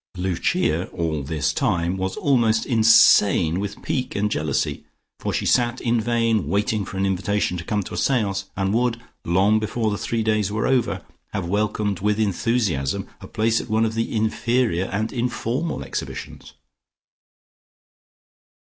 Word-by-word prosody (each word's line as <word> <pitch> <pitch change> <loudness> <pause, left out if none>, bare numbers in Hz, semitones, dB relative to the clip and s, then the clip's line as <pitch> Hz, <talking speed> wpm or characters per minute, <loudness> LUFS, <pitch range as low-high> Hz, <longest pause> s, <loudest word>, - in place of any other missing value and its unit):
Lucia, 90 -1 0
all 80 -3 -2
this 70 0 -1
time, 85 +1 0
was 95 0 -3
almost 115 -5 +2
insane 105 - +5
with 100 0 -5
pique 130 -1 -2
and 105 +1 0
jealousy, 75 -7 -1 0.4
for - - -2
she - - -2
sat 120 0 +2
in 115 -1 +1
vain 115 -2 +1
waiting 105 +1 0
for 95 - -7
an 95 - +1
invitation 95 0 0
to 85 - -5
come 105 +3 -1
to - - -9
a - - -4
seance, 100 -7 0
and 95 0 0
would, 120 0 +1 0.2
long 95 +5 +3
before 110 0 -1
the 100 - -3
three 115 +2 -1
days 110 -2 +1
were 105 +1 -1
over, 130 -3 0 0.3
have 95 -4 -2
welcomed 105 0 -1
with 105 +2 0
enthusiasm 100 - 0
a - - -10
place 110 +1 +1
at - - -11
one 110 +1 +2
of 110 - -2
the 115 +1 -2
inferior 110 -3 +1
and 105 +3 -3
informal 125 +5 -2
exhibitions. - - -7
105 Hz, 155 wpm, -23 LUFS, 95-115 Hz, 0.4 s, insane